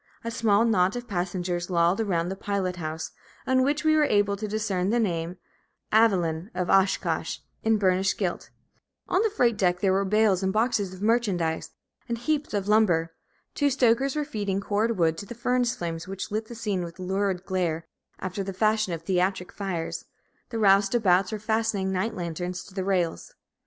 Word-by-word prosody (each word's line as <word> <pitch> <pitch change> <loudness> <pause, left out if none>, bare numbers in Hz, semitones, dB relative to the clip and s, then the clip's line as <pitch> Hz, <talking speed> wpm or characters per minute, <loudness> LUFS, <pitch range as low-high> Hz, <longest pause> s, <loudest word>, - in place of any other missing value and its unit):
A 230 - -3
small 225 -1 +3
knot 190 -3 +2
of 245 0 -5
passengers 175 -2 -2
lolled 175 +3 +2
around 175 -5 0
the 190 - -3
pilot 195 -2 -2
house, 160 -1 -4 0.3
on 260 0 +3
which 285 +3 +1
we 310 0 +5
were 305 -1 +4
just - - 0
able 205 -1 +3
to 215 +2 -4
discern 200 -3 -1
the 240 +2 +2
name 175 -4 -1 0.6
"Evalyn, 185 -6 +3
of 180 -1 -1
Oshkosh," 195 0 +2 0.2
in 220 0 +3
burnished 190 -1 +2
gilt; - - -2 0.6
on 370 - +2
the 445 - +2
freight 240 - +2
deck 180 -2 +2
there 190 -1 +2
were 195 +1 +2
bales 205 -1 +3
and 190 0 +1
boxes 215 -3 +1
of 185 +1 -9
merchandise, 200 -8 +1 0.4
and 235 - -1
heaps 300 +4 -1
of 200 -1 -1
lumber; 175 -7 +3 0.4
two 290 -1 +2
stokers 265 +1 +2
were 300 -1 -1
feeding 205 -8 -2
cord 215 +3 0
wood 165 -2 +2
to 200 - -8
the 240 - -8
furnace 245 +1 +1
flames, 165 -5 -5
which 195 +2 -5
lit 215 +1 -2
the 235 - -9
scene 210 -5 -2
with 170 0 -8
lurid 190 0 -1
glare, 170 -4 -1 0.3
after 190 +1 -4
the 195 0 -5
fashion 215 -1 +1
of 165 -1 -5
theatric 185 +1 0
fires; 185 -5 -4 0.4
the 230 - -4
roustabouts 195 -2 +4
were 215 - -2
fastening 215 -2 0
night 190 +5 -1
lanterns 175 +1 -4
to 195 - -15
the 190 -1 -2
rails. 180 -4 -1
195 Hz, 185 wpm, -26 LUFS, 180-220 Hz, 0.6 s, we